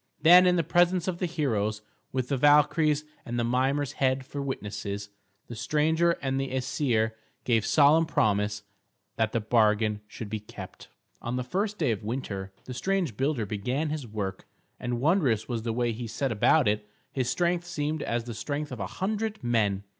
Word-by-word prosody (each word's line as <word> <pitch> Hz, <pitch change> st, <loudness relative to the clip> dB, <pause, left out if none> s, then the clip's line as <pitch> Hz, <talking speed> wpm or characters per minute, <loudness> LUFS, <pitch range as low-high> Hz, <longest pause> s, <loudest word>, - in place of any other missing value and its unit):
Then 175 Hz, +4 st, +8 dB
in 180 Hz, -, +4 dB
the 170 Hz, -, +2 dB
presence 175 Hz, +3 st, +2 dB
of 180 Hz, -2 st, -2 dB
the 180 Hz, -, 0 dB
heroes, 110 Hz, -10 st, -1 dB, 0.3 s
with 130 Hz, -1 st, -2 dB
the 140 Hz, -, +1 dB
Valkyries 150 Hz, +2 st, +4 dB, 0.2 s
and 120 Hz, +1 st, -4 dB
Mimer's 130 Hz, +4 st, +1 dB
head 130 Hz, -2 st, 0 dB
for 140 Hz, +2 st, -5 dB
witnesses, 105 Hz, -6 st, -4 dB, 0.4 s
the 120 Hz, -, -8 dB
stranger 155 Hz, +8 st, +2 dB
and 135 Hz, 0 st, 0 dB
the 135 Hz, -, -3 dB
Æsir 125 Hz, -3 st, 0 dB, 0.3 s
gave 115 Hz, -3 st, +1 dB
solemn 155 Hz, +2 st, +5 dB
promise 105 Hz, -7 st, +1 dB, 0.5 s
that 110 Hz, -1 st, +1 dB
the 115 Hz, -, 0 dB
bargain 110 Hz, -1 st, +2 dB
should 105 Hz, 0 st, -7 dB
be 110 Hz, +1 st, -3 dB
kept. 105 Hz, -, -11 dB, 0.3 s
On 120 Hz, +1 st, -3 dB
the 125 Hz, -, -1 dB
first 200 Hz, -, -2 dB
day 150 Hz, -9 st, +1 dB
of 105 Hz, -3 st, -3 dB
winter 105 Hz, -5 st, -4 dB
the 130 Hz, -, -6 dB
strange 180 Hz, -, -1 dB
builder 135 Hz, -2 st, 0 dB
began 125 Hz, +10 st, -2 dB
his 150 Hz, -5 st, -4 dB
work, 100 Hz, -3 st, -5 dB, 0.3 s
and 120 Hz, -1 st, -2 dB
wondrous 140 Hz, -, +2 dB
was 120 Hz, -3 st, -2 dB
the 115 Hz, 0 st, -2 dB
way 120 Hz, +1 st, 0 dB
he 115 Hz, +1 st, -5 dB
set 130 Hz, +4 st, -2 dB
about 125 Hz, +6 st, +4 dB
it. 105 Hz, 0 st, 0 dB, 0.2 s
His 130 Hz, -2 st, -1 dB
strength 175 Hz, +2 st, 0 dB
seemed 150 Hz, -1 st, -2 dB
as 115 Hz, 0 st, -1 dB
the 120 Hz, 0 st, -6 dB
strength 145 Hz, +5 st, -4 dB
of 125 Hz, -, -6 dB
a 95 Hz, -, -3 dB
hundred 215 Hz, -, -3 dB
men. 105 Hz, -5 st, +1 dB
125 Hz, 180 wpm, -27 LUFS, 110-150 Hz, 0.5 s, Then